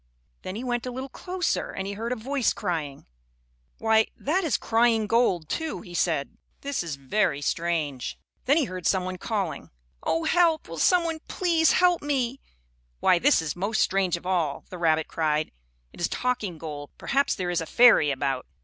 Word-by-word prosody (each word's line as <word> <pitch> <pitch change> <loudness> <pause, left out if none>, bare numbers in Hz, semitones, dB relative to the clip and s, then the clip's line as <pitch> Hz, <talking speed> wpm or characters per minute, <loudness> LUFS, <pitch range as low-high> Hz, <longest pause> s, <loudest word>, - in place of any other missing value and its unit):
Then 185 - -6
he 230 - -5
went 245 -1 -2
a - - -3
little 260 +2 -6
closer 365 +5 -2
and 190 - -5
he 200 - -4
heard 225 +4 -4
a - - +1
voice 255 +2 0
crying. 160 -8 -4 0.7
"Why, 220 0 +3
that 355 +7 0
is 320 - +1
crying 225 -1 +2
gold, 210 -8 +2
too," 320 - -3
he 180 -4 -12
said. 160 -5 -1 0.2
"This 280 -1 -2
is 165 -4 -4
very 140 +3 0
strange." 155 -4 -2 0.3
Then 280 +4 +4
he 320 - +3
heard 185 -4 -4
some 190 -2 +2
one 185 0 -5
calling: 200 -7 -3 0.3
"Oh, 165 +1 0
help! 335 -3 +3
Will 165 -1 -7
some 360 - +4
one 330 -1 -3
please 335 -4 +2
help 360 -1 +3
me?" 270 -3 -1 0.6
"Why, 175 - +4
this 280 - +4
is 155 - -3
most 200 +5 -1
strange 190 -2 +2
of 170 - -14
all!" 170 -6 -1
the 180 - -7
rabbit 160 -2 +2
cried. 155 -1 0 0.4
"It - - -11
is 170 - +2
talking 220 -9 -2
gold. 150 -2 -7
Perhaps 275 +1 +1
there 180 -2 -2
is 175 -1 0
a 165 - -5
fairy 235 -10 +6
about." 135 -2 -2
195 Hz, 185 wpm, -26 LUFS, 165-255 Hz, 0.7 s, fairy